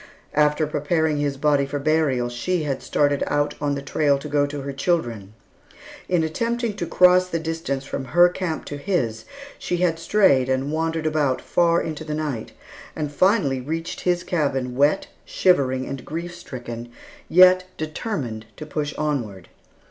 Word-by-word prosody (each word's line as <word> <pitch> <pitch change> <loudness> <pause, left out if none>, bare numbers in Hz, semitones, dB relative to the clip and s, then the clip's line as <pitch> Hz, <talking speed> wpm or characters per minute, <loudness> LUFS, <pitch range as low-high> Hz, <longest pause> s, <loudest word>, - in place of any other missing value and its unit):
After 150 +1 +3
preparing 150 +1 0
his 145 -1 -1
body 145 0 +2
for 145 - -3
burial, 140 -4 +1
she 155 +8 -2
had 135 -3 -2
started 145 -1 +1
out 145 0 0
on 145 -1 0
the 140 - -5
trail 145 0 +2
to 140 - -7
go 145 -1 +1
to 145 0 -5
her 140 0 -5
children. 120 - -2 0.7
In 175 -3 +2
attempting 230 +7 -1
to 170 - -3
cross 180 +1 +5
the 165 - -1
distance 160 -4 -3
from 135 - -4
her 175 +7 +5
camp 180 -2 -3
to 145 - -6
his, 130 - -2 0.3
she 175 - -2
had 170 -2 +1
strayed 165 -8 +3
and 130 +2 0
wandered 160 0 -1
about 150 -4 +1
far 170 -1 +2
into 155 -1 -4
the 155 -1 -4
night, 145 -8 -4 0.4
and 150 -2 -3
finally 145 - +2
reached 165 +5 -4
his 175 -1 +1
cabin 140 -8 -1
wet, 145 +8 +3 0.2
shivering, 130 -8 +2
and 135 -1 -6
grief 170 +2 -5
stricken, 120 -7 -8 0.4
yet 185 +1 +6
determined 155 - -4
to 155 - -7
push 150 -1 -3
onward. 120 -12 -3
150 Hz, 165 wpm, -23 LUFS, 135-170 Hz, 0.7 s, yet